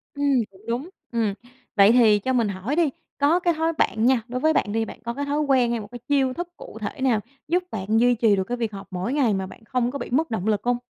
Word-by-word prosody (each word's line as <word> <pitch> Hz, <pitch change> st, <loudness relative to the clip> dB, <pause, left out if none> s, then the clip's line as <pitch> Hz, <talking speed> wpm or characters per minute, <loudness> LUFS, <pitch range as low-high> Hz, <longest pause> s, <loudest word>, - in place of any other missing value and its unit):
Ừm, 280 Hz, -4 st, +2 dB
cũng 190 Hz, -, -19 dB
đúng, 245 Hz, +8 st, -2 dB, 0.2 s
ừm. 225 Hz, -4 st, 0 dB, 0.4 s
Vậy 200 Hz, 0 st, +7 dB
thì 225 Hz, -4 st, +5 dB
cho 260 Hz, +6 st, -1 dB
mình 235 Hz, -4 st, +2 dB
hỏi 200 Hz, +8 st, -3 dB
đi, 330 Hz, -2 st, +3 dB, 0.3 s
có 295 Hz, +5 st, +3 dB
cái 350 Hz, -1 st, +2 dB
thói 325 Hz, +1 st, 0 dB
bạn 225 Hz, -7 st, +1 dB
nha, 255 Hz, -1 st, +4 dB
đối 250 Hz, +1 st, -3 dB
với 315 Hz, +4 st, +3 dB
bạn 205 Hz, -, +1 dB
đi 225 Hz, +1 st, 0 dB
bạn -, -, -10 dB
có 235 Hz, +1 st, -3 dB
cái 285 Hz, +3 st, -3 dB
thói 290 Hz, +1 st, -1 dB
quen 265 Hz, -5 st, +3 dB
hay 235 Hz, -, -1 dB
một 205 Hz, -, -8 dB
cái 245 Hz, -, -8 dB
chiêu 270 Hz, -3 st, +2 dB
thức 350 Hz, +5 st, -4 dB
cụ -, -, -10 dB
thể 280 Hz, -, -5 dB
nào 250 Hz, -5 st, +3 dB, 0.3 s
giúp 355 Hz, +4 st, +1 dB
bạn 215 Hz, +2 st, 0 dB
duy 245 Hz, +1 st, +4 dB
trì 220 Hz, -3 st, +3 dB
được 190 Hz, -, 0 dB
cái 245 Hz, +6 st, -4 dB
việc 230 Hz, -3 st, -2 dB
học 200 Hz, -1 st, -9 dB
mỗi 185 Hz, +7 st, -2 dB
ngày 265 Hz, -7 st, +2 dB
mà 190 Hz, -1 st, -2 dB
bạn 205 Hz, -, -14 dB
không 250 Hz, 0 st, 0 dB
có 280 Hz, -, -5 dB
bị 240 Hz, -, -5 dB
mất 310 Hz, +6 st, +1 dB
động 215 Hz, -3 st, -2 dB
lực 210 Hz, -2 st, +1 dB
hông? 245 Hz, 0 st, +1 dB
245 Hz, 280 wpm, -24 LUFS, 220-285 Hz, 0.4 s, Vậy